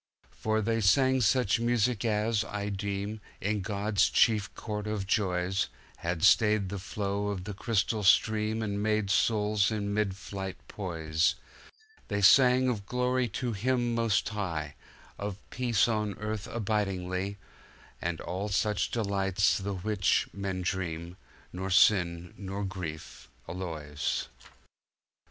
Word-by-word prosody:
For 110 0 -1
they 115 +1 0
sang 130 +6 +4
such 115 -1 +3
music 120 -1 +1
as, 110 -1 +1
I 105 -1 -4
deem, 100 +1 -3 0.2
In 105 +1 -1
God's 100 0 +1
chief 110 -3 +3
court 105 -1 -4
of 105 -2 -2
joys, 95 -2 0 0.3
Had 85 -1 -3
stayed 105 -1 +4
the 100 0 -4
flow 100 +1 -2
of 100 -3 -3
the 105 +1 -5
crystal 110 +1 0
stream 110 +2 +3
And 100 -1 -2
made 105 -2 +1
souls 105 0 +2
in 100 -2 -2
mid 105 -2 0
flight 95 -1 -6
poise; 80 -4 0 0.7
They 100 -2 -1
sang 125 +5 +6
of 105 -6 -2
Glory 125 0 +1
to 120 +1 -3
Him 120 +3 0
most 115 -4 +1
High, 80 -8 -3 0.5
Of 100 -1 -4
Peace 120 -4 +2
on 105 -3 -1
Earth 105 -1 -4
abidingly, 100 -3 -2 0.6
And 85 -1 -2
of - - -9
all 100 +3 -3 0.4
delights 100 -4 +1
the 100 0 -3
which, 95 0 +1
men 95 -2 -3
dream, 85 -1 -3 0.4
Nor 95 +1 -4
sin 90 -3 +3
nor 100 0 -4
grief 80 -10 -7 0.2
alloys. 75 -5 -3
100 Hz, 130 wpm, -29 LUFS, 95-110 Hz, 0.7 s, sang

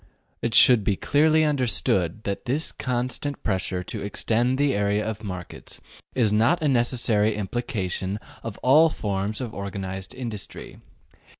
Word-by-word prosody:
It 115 0 -1
should 120 -5 +7
be 100 - +1
clearly 155 +7 +3
understood 110 - 0
that 100 +2 -3
this 140 +6 -1
constant 130 +3 -3
pressure 95 -2 -1
to - - -6
extend 115 +5 0
the 145 -1 +2
area 105 +1 +1
of 110 0 -4
markets 90 -4 -7 0.4
is 110 -5 +3
not 140 +11 +3
a - - +3
necessary 120 -4 +2
implication 100 -3 -3 0.2
of 115 -3 -6
all 150 +6 +6
forms 100 -3 -3
of 120 -4 -5
organized 95 0 -5
industry. 115 -5 -7
110 Hz, 135 wpm, -25 LUFS, 100-130 Hz, 0.4 s, should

